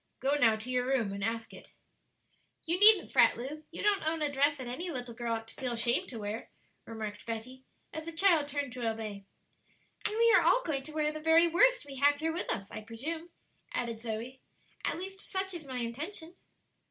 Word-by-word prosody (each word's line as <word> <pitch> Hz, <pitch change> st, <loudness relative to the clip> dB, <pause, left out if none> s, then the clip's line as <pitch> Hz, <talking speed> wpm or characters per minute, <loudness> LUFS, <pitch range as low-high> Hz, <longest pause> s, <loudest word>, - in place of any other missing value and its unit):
Go, 275 Hz, +2 st, +1 dB
now, 230 Hz, -7 st, +4 dB
to 220 Hz, +4 st, -6 dB
your 250 Hz, 0 st, 0 dB
room 240 Hz, -7 st, +1 dB
and 200 Hz, 0 st, -4 dB
ask 225 Hz, +1 st, -2 dB
it." -, -, -13 dB, 0.9 s
"You 340 Hz, +2 st, 0 dB
needn't 420 Hz, -2 st, +8 dB
fret, -, -, +5 dB
Lu; 290 Hz, +6 st, -6 dB
you -, -, -7 dB
don't 410 Hz, -1 st, +3 dB
own 315 Hz, 0 st, 0 dB
a 290 Hz, -, 0 dB
dress 285 Hz, +1 st, +2 dB
that 260 Hz, -, -6 dB
any 290 Hz, +9 st, -4 dB
little 250 Hz, -6 st, -4 dB
girl 235 Hz, 0 st, -2 dB
ought 225 Hz, 0 st, -6 dB
to -, -, -12 dB
feel 255 Hz, -2 st, -2 dB
ashamed 235 Hz, +1 st, +1 dB
to 240 Hz, -, -7 dB
wear," 210 Hz, +1 st, -5 dB, 0.4 s
remarked 215 Hz, -2 st, -7 dB
Betty, 250 Hz, +3 st, -6 dB, 0.3 s
as 315 Hz, 0 st, -5 dB
the -, -, -3 dB
child 330 Hz, -3 st, +4 dB
turned 285 Hz, -3 st, -3 dB
to 240 Hz, -3 st, -1 dB
obey. 215 Hz, -3 st, -6 dB, 0.8 s
"And 425 Hz, -, -2 dB
we 465 Hz, 0 st, +5 dB
are -, -, +6 dB
all -, -, +4 dB
going 285 Hz, -5 st, -1 dB
to 270 Hz, -, -9 dB
wear 305 Hz, 0 st, 0 dB
the 310 Hz, -, -6 dB
very 325 Hz, +2 st, +5 dB
worst -, -, +4 dB
we 275 Hz, -1 st, -9 dB
have 285 Hz, +1 st, +4 dB
here 320 Hz, +1 st, -1 dB
with 350 Hz, -, -3 dB
us, 195 Hz, 0 st, -3 dB
I -, -, -6 dB
presume," 300 Hz, +10 st, -6 dB, 0.5 s
added 230 Hz, -2 st, -2 dB
Zoe; 230 Hz, +3 st, -5 dB, 0.4 s
"at -, -, -1 dB
least 385 Hz, +2 st, -7 dB
such 385 Hz, 0 st, -3 dB
is 325 Hz, -5 st, -7 dB
my 260 Hz, -1 st, -5 dB
intention." 310 Hz, -, -5 dB
270 Hz, 215 wpm, -31 LUFS, 230-325 Hz, 0.9 s, needn't